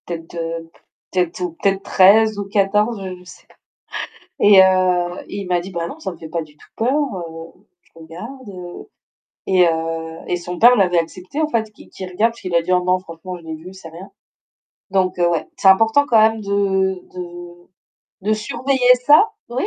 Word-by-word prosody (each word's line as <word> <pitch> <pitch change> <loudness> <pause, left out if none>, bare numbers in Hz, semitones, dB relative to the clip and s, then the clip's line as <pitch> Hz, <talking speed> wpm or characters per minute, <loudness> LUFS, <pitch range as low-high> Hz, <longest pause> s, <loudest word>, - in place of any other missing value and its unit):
Peut-être, 165 -1 -7
heu, 165 0 -5
p - - -25 0.3
peut-être 180 -2 -1
ou 180 -1 -2
peut-être 195 0 +1
13 210 +3 +5
ou 200 - -3
14, 205 +2 +1 0.2
je - - -16
sais 180 - -15
pas - - -24 0.8
et 205 -2 +7
heu 180 -1 +2
et - - -7
il 195 - -6
m'a 180 -1 +1
dit: 185 +3 -8
«Bah 170 -1 -3
non, - - -9
ça 190 - -5
me - - -13
fait 160 - -9
pas 165 +1 -3
du 150 -1 -16
tout - - -19
peur, 235 +4 +1
heu, 175 - -4 0.3
je - - -32
regarde» 180 +1 -10 0.6
et 185 -2 +4
heu 165 0 -3
et - - 0
son 175 0 -7
père 245 +2 +7
l'avait 180 -5 +3
accepté 185 - -6
en 310 - +1
fait, 220 -6 -2
qu'il - - -17
qu'il 185 - -8
regarde 210 +6 +1
parce - - -16
qu'il 185 -3 -3
a 170 - +4
dit: 180 - -3
«Oh 180 0 +2
non, 180 +1 +2
franchement, 180 0 -9
je 170 - -16
l'ai 160 -1 -6
vu, 175 +4 -11
c'est 190 -3 -11
rien» 170 +4 -12 0.8
donc 185 -2 +1
ouais, 175 -2 +1
c'est - - +2
important 225 +8 +4
quand 230 -5 +4
même 220 0 +3
de 190 -2 0
de 175 -1 -9 0.6
de 210 +3 +1
surveiller 250 +4 +2
ça, 305 - +6 0.2
oui. 250 +3 -2
185 Hz, 200 wpm, -19 LUFS, 175-210 Hz, 0.8 s, et